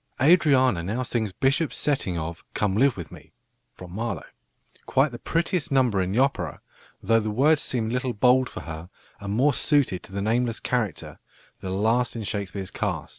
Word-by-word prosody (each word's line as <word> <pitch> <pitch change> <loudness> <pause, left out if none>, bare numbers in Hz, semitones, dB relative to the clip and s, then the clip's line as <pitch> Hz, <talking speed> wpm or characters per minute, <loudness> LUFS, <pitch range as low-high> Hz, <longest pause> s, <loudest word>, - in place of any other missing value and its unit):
Adriana 135 - +4
now 110 +9 -2
sings 115 -4 -2
Bishop's 140 - 0
setting 130 - 0
of 85 +1 -5
"Come 100 -2 0
live 130 +2 +3
with 85 - -7
me" - - -14 0.5
(Marlowe), 100 +6 -4 0.6
quite 135 +2 +2
the 120 - -8
prettiest 170 +1 -1
number 125 -8 +3
in 90 0 -1
the 105 - -1
opera, 135 +2 0 0.4
though 115 0 +4
the 110 -1 -2
words 140 +8 +3
seem 115 -3 0
a - - -3
little 125 -1 -1
bold 125 +3 +3
for - - -8
her, 80 +1 -8 0.3
and 100 0 -4
more 140 +5 +3
suited 140 - +1
to - - -14
the 100 - -4
nameless 115 +1 0
character, 110 -9 -3 0.4
the 95 - -6
last 110 +6 +1
in 115 - -4
Shakespeare's 100 -2 -4
cast. - - -3
115 Hz, 180 wpm, -25 LUFS, 100-130 Hz, 0.6 s, Adriana